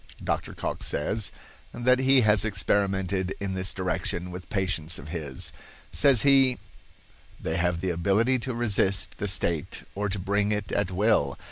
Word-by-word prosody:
Dr. - - -2
Cocke - - -4
says 100 +7 -1 0.4
that 125 +1 +3
he 130 0 +5
has 105 -4 +4
experimented 95 -2 0
in 100 -1 -3
this 95 -1 0
direction 90 -1 -3
with 90 0 -9
patients 90 -3 0
of 75 - -9
his. 75 -6 -4 0.4
Says 135 -6 +4
he: 135 -2 +5 0.8
"They 80 - -2
have 85 -1 0
the 95 -1 0
ability 100 +9 +2
to 125 +1 -4
resist 100 -5 +1
the 105 - -2
state 85 -5 -1
or 105 +1 -2
to 100 - -2
bring 100 +2 0
it 105 -1 -2
at 100 -2 0
will. 95 -7 +1
100 Hz, 155 wpm, -26 LUFS, 90-110 Hz, 0.8 s, he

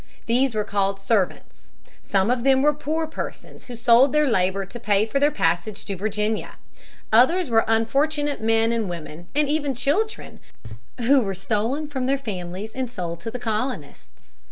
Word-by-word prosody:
These 245 +1 +1
were 210 - +1
called 195 -1 -1
servants. 195 -2 -2 0.3
Some 195 +3 +1
of 250 -1 0
them 265 0 +4
were 300 0 +4
poor 310 +2 -2
persons 315 - -8
who 245 - -7
sold 240 +4 +5
their 300 0 +4
labor 190 -3 +1
to 240 +5 -10
pay 205 -1 +2
for 250 +5 -1
their 290 +1 +4
passage 175 - -1
to 195 - -4
Virginia. 210 +2 -2 0.6
Others 295 +7 +4
were 225 0 +4
unfortunate 280 +6 +1
men 225 +1 +2
and 225 -4 -1
women 170 0 -8
and 300 0 +2
even 290 -2 -1
children 365 - -2 0.6
who 265 +3 +4
were 195 -4 -3
stolen 220 - -1
from 265 -4 -3
their 275 +1 +2
families 195 -3 -6
and 260 -2 -3
sold 170 -7 -5
to 190 - -5
the 245 - -5
colonists. 155 - -5
225 Hz, 170 wpm, -23 LUFS, 195-275 Hz, 0.6 s, sold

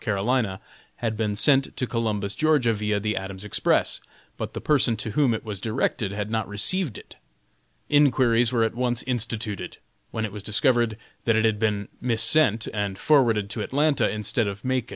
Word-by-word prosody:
C., 110 - -1 0.8
had 115 -2 -2
been 105 -1 -1
sent 135 +5 +2
to 130 - 0
Columbus, 110 -4 -2
Ga., 155 +8 +3 0.2
via 105 -1 -1
the 105 +1 -2
Adams 95 +1 -6
Express, 105 - 0 0.3
but - - -5
the - - -3
person 135 -6 +2
to 105 +1 -4
whom 135 +2 +2
it 110 - -7
was 105 -3 -5
directed 110 -2 -1
had 105 +1 -4
not 110 -2 -1
received 115 - 0
it. - - -14 0.7
Inquiries 125 -5 +3
were 115 -2 +2
at 115 - 0
once 120 -1 -1
instituted, 115 -4 -3 0.3
when 110 -1 -3
it 105 - -6
was 105 0 -7
discovered 115 +2 +1 0.3
that 115 - +3
it 110 0 +2
had 110 -2 +1
been 105 -2 0
missent, 115 -1 +3
and 100 -2 -2
forwarded 115 -7 +3
to 110 - -3
Atlanta, 145 +5 +1
instead 110 +2 -1
of 100 +4 -6
Macon. 130 -2 -1
110 Hz, 175 wpm, -25 LUFS, 105-125 Hz, 0.8 s, Ga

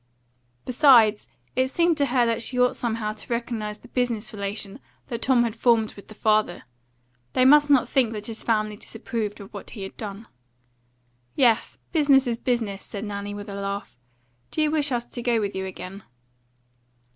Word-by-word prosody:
Besides, 235 -5 +5 0.3
it 260 +1 +2
seemed 335 +5 +2
to 285 -1 +2
her 245 -2 +3
that 230 0 0
she 250 +2 +1
ought 250 0 +4
somehow 225 -3 -2
to 215 +2 -8
recognise 230 -3 -3
the - - -16
business 240 -3 -2
relation 200 +2 -4 0.3
that 235 -2 -4
Tom 250 -2 +4
had 230 -2 -2
formed 225 -2 +2
with 200 - -14
the 215 - -12
father; 215 -4 +1 0.7
they 255 - +3
must 295 +2 +6
not 275 -3 +5
think 250 -5 +2
that 210 -1 -6
his 225 0 -6
family 215 -2 0
disapproved 215 -1 -5
of 200 +1 -11
what 200 - -8
he 205 - -7
had 195 - -8
done. 210 0 -7 1.1
"Yes, 235 -4 +2
business 280 -5 +4
is 235 -2 -1
business," 225 -6 -1
said 205 +1 -6
Nanny, 205 0 -5
with 205 +1 -7
a 200 - -6
laugh. 200 0 -4 0.5
"Do 310 - 0
you 300 - +2
wish 300 -2 +1
us 240 -1 -1
to 240 - -7
go 235 -1 +2
with 205 -2 -2
you 190 0 -3
again?" 190 +1 -8
225 Hz, 180 wpm, -25 LUFS, 210-250 Hz, 1.1 s, must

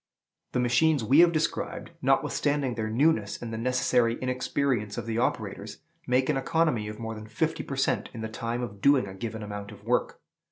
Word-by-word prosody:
The - - +1
machines 125 +3 +3
we 135 +8 +5
have 170 0 +7
described, 160 -1 -2
notwithstanding 145 -3 +1
their 110 -2 -3
newness 115 -3 +2
and 115 -1 -6
the - - -3
necessary 125 -1 +2
inexperience 130 -4 -1
of 120 - -3
the 115 0 -1
operators, 105 -3 -2 0.3
make 125 +1 +2
an 150 - +1
economy 135 -5 +1
of 105 0 -6
more 115 -1 -5
than 110 0 -9
fifty 110 - -1
per - - -5
cent. - - 0
in 115 - -7
the 110 - -3
time 115 +2 -3
of 100 -4 -7
doing 140 -4 +5
a 95 - -8
given 110 +2 -5
amount 105 -1 -6
of - - -13
work. - - 0
120 Hz, 195 wpm, -27 LUFS, 110-130 Hz, 0.3 s, have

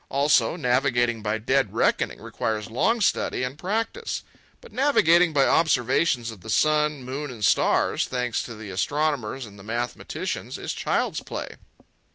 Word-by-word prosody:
Also, 140 -2 +3
navigating 120 -5 +1
by 105 +1 -1
dead 130 +5 0
reckoning - - +1
requires 110 -1 -3
long 225 - +1
study 185 - +1
and 130 +4 -4
practice. 225 - -2 0.4
But 475 - -16
navigating 180 - +4
by 140 -3 +3
observations 125 -5 +2
of 105 -5 -12
the 110 - -10
sun, 150 +2 +2
moon, 140 +4 -5
and 115 -5 -3
stars, - - +2
thanks 125 -2 -1
to 115 - -8
the 105 -2 -8
astronomers 135 +2 -1
and 100 -2 -13
mathematicians, 120 +3 -4
is - - -4
child's - - -1
play. - - -7
130 Hz, 145 wpm, -25 LUFS, 115-155 Hz, 0.4 s, navigating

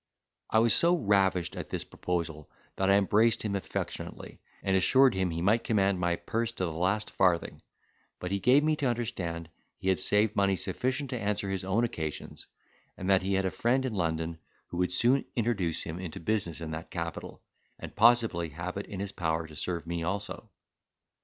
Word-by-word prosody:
I - - +2
was 115 0 +5
so 170 +1 +4
ravished 100 - +2
at - - -6
this - - -2
proposal 80 -4 -4 0.3
that 95 0 +1
I 100 - +6
embraced 105 +3 +3
him 105 -2 -1
affectionately, 100 - -5 0.2
and 95 -1 +1
assured 130 +7 +5
him 95 -1 0
he 85 0 -3
might 110 +5 +3
command 100 -4 +2
my 85 -1 +1
purse 115 +5 -2
to 95 - -2
the 85 - -3
last 95 +6 0
farthing; 90 -3 +1 0.6
but 90 - -5
he 100 - 0
gave 130 +8 +5
me 155 0 +2
to 140 - 0
understand 95 -9 -3 0.3
he 95 - -2
had 95 - +2
saved 105 +1 +3
money 100 -1 +3
sufficient 130 +7 -2
to 125 - -2
answer 100 -2 -1
his 95 -1 -2
own 100 +5 +1
occasions; 80 -10 -4 0.5
and 90 - -5
that 95 - +5
he 95 +1 0
had 95 0 +1
a 95 - 0
friend 130 +3 +1
in 125 - -2
London 80 -3 -2 0.3
who 85 - -6
would 90 0 +1
soon 125 +8 +3
introduce 100 -9 0
him 85 +2 -6
into 90 -4 -6
business 85 -4 0
in 80 -1 -5
that 80 +1 -6
capital, 85 -1 -6 0.3
and - - -9
possibly 110 -7 +4
have 85 +5 -5
it 100 - -5
in 100 -3 -6
his 100 0 -3
power 80 -3 -1
to 80 -1 -12
serve 85 +2 -3
me 85 0 -3
also. 95 +4 -4
95 Hz, 195 wpm, -29 LUFS, 85-110 Hz, 0.6 s, I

